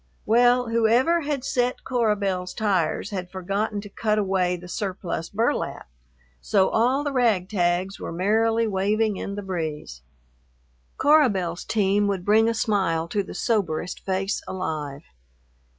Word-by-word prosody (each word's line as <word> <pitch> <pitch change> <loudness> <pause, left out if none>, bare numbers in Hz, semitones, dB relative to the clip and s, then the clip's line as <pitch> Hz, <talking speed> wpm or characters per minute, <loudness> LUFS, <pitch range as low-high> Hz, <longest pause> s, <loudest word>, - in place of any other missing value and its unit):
Well, 245 +2 +4
whoever 235 +9 +3
had 285 -3 -2
set 250 -2 -1
Cora 235 -5 +1
Belle's 185 -3 -3
tires 200 -3 0
had 185 -3 -4
forgotten 200 +3 -2
to 205 - -10
cut 215 +1 -1
away 190 -3 +1
the 180 0 -10
surplus 180 -4 -4
burlap, 225 +4 -1 0.5
so 195 -2 +2
all 255 +5 +2
the 290 - -2
ragtags 190 -5 +1
were - - -5
merrily 225 +6 +2
waving 210 +1 0
in 200 - -5
the 205 - -5
breeze. 155 - -5 1.0
Cora 295 -2 +5
Belle's 180 -4 -3
team 205 -1 +1
would 190 -3 -2
bring 220 +2 +4
a 230 - -1
smile 190 -8 0
to 205 - 0
the 195 - -9
soberest 180 -6 -1
face 195 +1 -1
alive. 155 -6 -4
200 Hz, 140 wpm, -24 LUFS, 180-225 Hz, 1.0 s, Cora